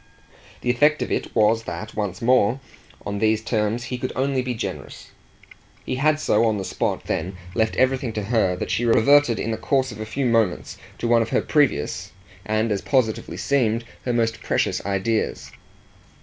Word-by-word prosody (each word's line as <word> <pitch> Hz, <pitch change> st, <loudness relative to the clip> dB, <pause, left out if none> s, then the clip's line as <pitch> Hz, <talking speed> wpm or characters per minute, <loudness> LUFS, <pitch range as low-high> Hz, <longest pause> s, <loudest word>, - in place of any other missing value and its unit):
The 125 Hz, -, +1 dB
effect 150 Hz, +5 st, +3 dB
of -, -, -6 dB
it -, -, -2 dB
was 110 Hz, +1 st, +3 dB
that, 100 Hz, +6 st, -6 dB
once 100 Hz, -2 st, -3 dB
more, 125 Hz, 0 st, +3 dB, 0.5 s
on 100 Hz, 0 st, -3 dB
these 110 Hz, 0 st, +2 dB
terms, 110 Hz, +1 st, -1 dB
he 125 Hz, 0 st, -5 dB
could 130 Hz, -, -3 dB
only 135 Hz, 0 st, 0 dB
be 125 Hz, -1 st, -3 dB
generous. -, -, -6 dB, 0.7 s
He 130 Hz, -, -2 dB
had 155 Hz, +2 st, +2 dB
so 110 Hz, -7 st, +2 dB
on 110 Hz, -2 st, +1 dB
the 95 Hz, -, -4 dB
spot -, -, -2 dB
then 90 Hz, +3 st, -3 dB, 0.2 s
left 110 Hz, 0 st, 0 dB
everything 130 Hz, -1 st, +1 dB
to 105 Hz, -, -3 dB
her 100 Hz, -4 st, +1 dB
that -, -, -4 dB
she 120 Hz, -, 0 dB
reverted 120 Hz, +2 st, +4 dB
in 115 Hz, -, -2 dB
the 110 Hz, -, -2 dB
course 130 Hz, -2 st, 0 dB
of 105 Hz, -, -10 dB
a 110 Hz, -, -4 dB
few 135 Hz, +5 st, -2 dB
moments 115 Hz, -6 st, +1 dB, 0.2 s
to 120 Hz, -, -2 dB
one 115 Hz, 0 st, +4 dB
of 115 Hz, -, -2 dB
her -, -, +1 dB
previous 140 Hz, -, 0 dB, 0.3 s
and 110 Hz, +1 st, 0 dB
as 100 Hz, -2 st, 0 dB
positively 125 Hz, -6 st, 0 dB
seemed 120 Hz, -5 st, +1 dB, 0.2 s
her 125 Hz, -, -1 dB
most 115 Hz, -1 st, 0 dB
precious -, -, 0 dB
ideas. 100 Hz, +3 st, -1 dB
115 Hz, 185 wpm, -23 LUFS, 110-130 Hz, 0.7 s, reverted